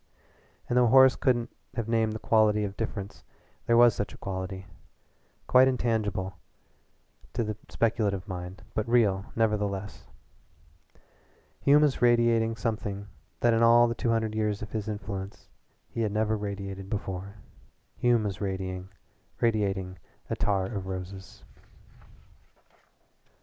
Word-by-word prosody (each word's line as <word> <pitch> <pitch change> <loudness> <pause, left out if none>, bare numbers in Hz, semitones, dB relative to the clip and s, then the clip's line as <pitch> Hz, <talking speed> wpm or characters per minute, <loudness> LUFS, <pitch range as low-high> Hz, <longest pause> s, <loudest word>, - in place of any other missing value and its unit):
And 120 - -1
though 125 -1 +5
Horace 130 +2 +7
couldn't 120 -3 0 0.2
have 115 -2 -2
named 115 -1 +1
the - - -3
quality 105 -1 +3
of 100 -1 -4
difference, 100 -2 -5 0.4
there 115 - +4
was 120 -1 +7
such 100 -2 -4
a - - -16
quality 95 0 -5 0.8
quite 130 +1 +6
intangible 105 -7 -1 0.9
to 120 - 0
the 110 -1 -3
speculative 105 -4 0
mind, 90 0 -7
but 110 +1 -2
real, 105 -5 +2
nevertheless. 105 -3 -1 1.5
Hume 145 - +5
was 145 -3 +1
radiating 120 -2 +3
something 105 -3 -3 0.3
that 120 -1 +4
in 115 - +2
all 120 +1 +6
the 115 - -1
two 115 +1 -2
hundred 110 -1 0
years 105 -1 -1
of 105 - -8
his 110 -1 -3
influence 100 -2 -6 0.4
he 115 - -4
had 110 -2 0
never 110 +1 +1
radiated 100 -2 -5
before. 100 -1 -4 0.6
Hume 120 -2 +2
was 100 -1 -4
radiating 95 +2 -3 0.5
attar 100 -2 0
of 95 -1 -4
roses. 95 +1 -7
105 Hz, 125 wpm, -28 LUFS, 100-115 Hz, 1.5 s, Horace